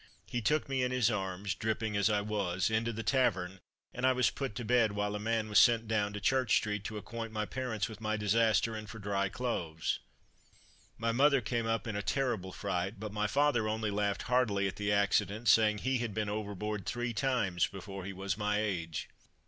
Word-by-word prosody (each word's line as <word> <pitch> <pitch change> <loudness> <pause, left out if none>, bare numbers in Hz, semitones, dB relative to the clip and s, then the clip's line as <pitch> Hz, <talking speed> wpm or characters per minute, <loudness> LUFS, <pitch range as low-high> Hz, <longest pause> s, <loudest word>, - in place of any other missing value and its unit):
He 120 - -3
took 150 +8 +1
me 135 -1 0
in 125 - +1
his 125 -3 +2
arms 95 -1 -2
dripping 110 +1 -2
as 100 +1 +3
I 105 -1 +2
was, 100 -2 -1
into 115 +1 +1
the 115 0 -5
tavern 95 -7 +1 0.3
and 125 - -6
I 130 0 +5
was 125 -1 +2
put 135 -7 -4
to 120 - -4
bed, 115 -3 +3
while 105 0 -1
a 105 - -3
man 110 0 0
was 105 -2 +5
sent 115 -1 +5
down 105 -2 +1
to 105 - -4
Church 130 +1 +2
street, 105 -2 0
to 110 - -4
acquaint 115 +2 -6
my 105 -1 -2
parents 125 -3 -2
with 110 -2 -10
my 110 0 -1
disaster, 110 +1 +2
and 105 -1 -7
for 115 - -8
dry 100 -2 -1
clothes. 85 -9 -2 1.0
My 115 0 0
mother 140 +3 +4
came 115 -1 -2
up 115 0 0
in 110 -3 -3
a 105 - -1
terrible 110 -4 -1
fright, 95 +1 -3
but 105 -1 -6
my 105 0 0
father 135 -2 +2
only 110 -1 -1
laughed 100 0 -1
heartily 115 -6 +2
at 95 - -5
the 100 0 0
accident, 100 +2 +1
saying 105 -1 +5
he 130 +3 0
had 115 -4 -3
been 105 -1 -1
overboard 105 -1 -4
three 120 -1 -2
times 105 -8 +1
before 95 0 -8
he 100 - -5
was 95 0 -3
my 105 -1 0
age. 85 -7 -2
105 Hz, 210 wpm, -32 LUFS, 100-115 Hz, 1.0 s, I